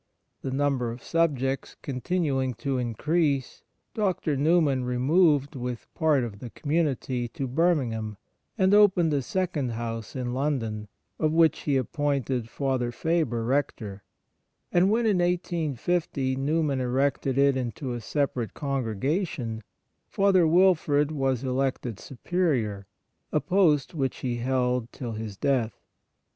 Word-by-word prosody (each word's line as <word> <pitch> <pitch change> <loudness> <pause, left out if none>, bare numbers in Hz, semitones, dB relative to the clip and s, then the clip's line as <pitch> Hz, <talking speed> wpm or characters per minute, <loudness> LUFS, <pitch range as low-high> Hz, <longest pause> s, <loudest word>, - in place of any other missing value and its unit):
The - - -3
number 135 -2 0
of 115 +1 -8
subjects 135 -5 0
continuing 135 -2 -1
to 135 +2 -2
increase, 140 +4 0 0.3
Dr. 185 -7 0
Newman 145 -2 +3
removed 140 +3 +2
with 125 -2 -5
part 155 -5 +2
of 105 -4 -6
the 120 - -7
community 140 -5 -1
to 130 +3 -4
Birmingham, 125 - 0 0.4
and 190 -1 +3
opened 190 -6 +5
a 140 - +1
second 150 -4 -2
house 115 0 -5
in 125 -2 -3
London, 120 -6 -2 0.3
of 155 - +2
which 165 0 +4
he 140 -2 +1
appointed 135 -3 -1
Father 130 -3 -1
Faber 145 -5 0
Rector; 115 -6 -2 0.7
and 180 +2 +4
when, 230 +2 +2
in 205 -4 +3
1850, 170 -5 0
Newman 140 0 0
erected 130 +1 0
it 140 -1 +4
into 125 +1 -3
a 120 - -5
separate 130 -2 -2
congregation, 135 - -2 0.5
Father 195 -4 +3
Wilfrid 155 -4 +3
was 135 -4 0
elected 130 -4 -1
Superior, 125 - -1 0.4
a 150 - +2
post 170 -6 +2
which 135 -5 -1
he 120 -2 -1
held 125 -1 0
till 120 -3 -6
his 110 -2 -6
death. 125 -5 0
135 Hz, 125 wpm, -27 LUFS, 125-160 Hz, 0.7 s, opened